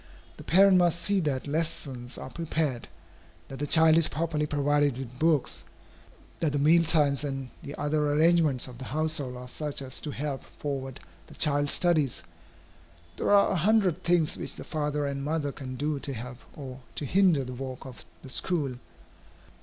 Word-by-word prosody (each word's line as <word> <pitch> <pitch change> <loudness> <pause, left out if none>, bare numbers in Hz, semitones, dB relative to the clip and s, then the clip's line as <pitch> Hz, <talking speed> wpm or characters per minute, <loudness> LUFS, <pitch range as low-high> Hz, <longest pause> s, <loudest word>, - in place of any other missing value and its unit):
The - - -10
parent 190 +3 +6
must 175 -1 +3
see 200 +1 +2
that 145 -6 -1
lessons 140 -5 -3
are 130 - -8
prepared, 155 -6 -2 0.6
that 135 - -8
the 145 - -2
child 160 +1 +5
is 165 - +3
properly 155 -1 -1
provided 145 -2 +1
with 130 -1 -8
books, 155 -4 +1 0.8
that 155 -3 0
the - - +1
meal 160 +4 +5
times 150 -4 +2
and 135 -3 -4
the 140 - -7
other 150 0 0
arrangements 155 -4 +3
of 125 -1 -11
the 130 - -6
household 145 -1 -1
are 125 0 -8
such 150 +3 -3
as 135 -1 -3
to 150 - -5
help 145 -1 -4 0.2
forward 135 -3 -4 0.3
the - - -14
child's 145 -1 +1
studies. 155 -7 +1 0.9
There - - -1
are 200 -1 +5
a - - +1
hundred 190 -1 +2
things 170 -2 +3
which - - -2
the - - -8
father 150 -2 -2
and 140 -1 -3
mother 150 -1 -1
can 130 -2 -7
do 145 +2 -1
to 140 - -4
help 125 +1 -7 0.2
or 130 -3 -8 0.2
to 150 - -2
hinder 180 -2 +3
the 125 0 -6
work 130 +1 -7
of 130 -2 -8 0.2
the 135 - -10
school. 145 -8 -1
145 Hz, 175 wpm, -28 LUFS, 135-160 Hz, 0.9 s, parent